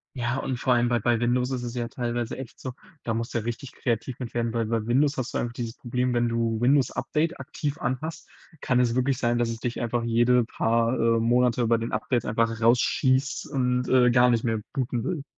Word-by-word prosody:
Ja, 120 +1 -1
und 130 -2 -3
vor 125 0 +2
allem 120 0 +2
bei 120 - +2
bei 120 +1 +1
Windows 125 +2 +1
ist 125 -2 -2
es 120 0 -5
ja 120 -1 -2
teilweise 120 -2 -3
echt 130 -3 -9
so, 130 -2 -6 0.3
da 115 - -1
musst 115 +1 -3
du - - 0
ja 110 - -2
richtig 120 +3 -5
kreativ 120 0 -2
mit 120 -2 -6
werden, 120 -1 -1
weil 115 -1 0
bei 115 0 -1
Windows 140 +4 +2
hast 130 - -3
du - - +2
einfach 120 0 -2
dieses 120 0 -5
Problem, 125 0 -1
wenn 120 0 +2
du 115 -1 0
Windows-Update 145 +5 +1
aktiv 145 +1 -4
an 125 +1 -2
hast, 160 +1 -6 0.3
kann 125 -1 +1
es 120 -1 +2
wirklich 130 0 +1
sein, 120 0 +1
dass 120 -1 +1
es 115 -1 -4
dich 120 0 -3
einfach 120 0 -1
jede 120 +1 +3
paar, 115 +1 +1
äh, 115 0 +3
Monate 120 0 +2
bei 115 0 +3
den 115 +1 -4
Updates 120 -2 -1
einfach 115 0 0
rausschießt 130 +3 +2
und, 125 -2 0
äh, 125 -1 +5
gar 125 0 +5
nicht 115 -1 +1
mehr 110 -2 0
booten 125 -4 -2
will. 150 -1 -3
120 Hz, 230 wpm, -26 LUFS, 115-125 Hz, 0.3 s, äh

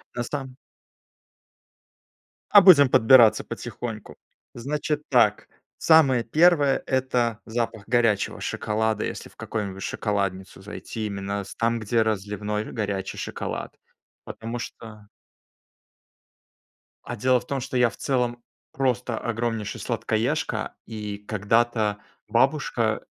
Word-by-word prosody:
На 120 - -2
сам 130 0 -6 1.9
А 205 - +9
будем 155 -9 +8
подбираться 120 -2 +6
потихоньку. 110 -3 -7 0.4
Значит 150 +4 -3
так, 115 -5 +3 0.3
самое 140 -7 +5
первое- 150 0 +3
это 125 -4 0
запах 115 -2 -3
горячего 115 -4 +1
шоколада. 110 0 -1
Если - - -6
в - - -24
какую-нибудь 100 -3 -5
шоколадницу 100 -3 -3
зайти, 105 +2 -6
именно 100 0 -4
с - - -11
там, 115 0 0
где 115 +1 +1
разливной 105 0 -2
горячий 100 -4 -3
шоколад. - - -5 0.5
Потому 115 +2 -6
что 105 -3 -10 1.9
А 120 - -6
дело 125 +3 +2
в - - -16
том, 140 -1 -2
что 130 0 -3
я 125 -1 +4
в 100 - -15
целом 120 -3 -1 0.3
просто 125 -3 -1
огромнейший 115 -2 -3
сладкоежка, - - -2
и 105 -2 -6
когда-то 105 +1 0 0.3
бабушка - - +1
115 Hz, 110 wpm, -24 LUFS, 105-125 Hz, 1.9 s, А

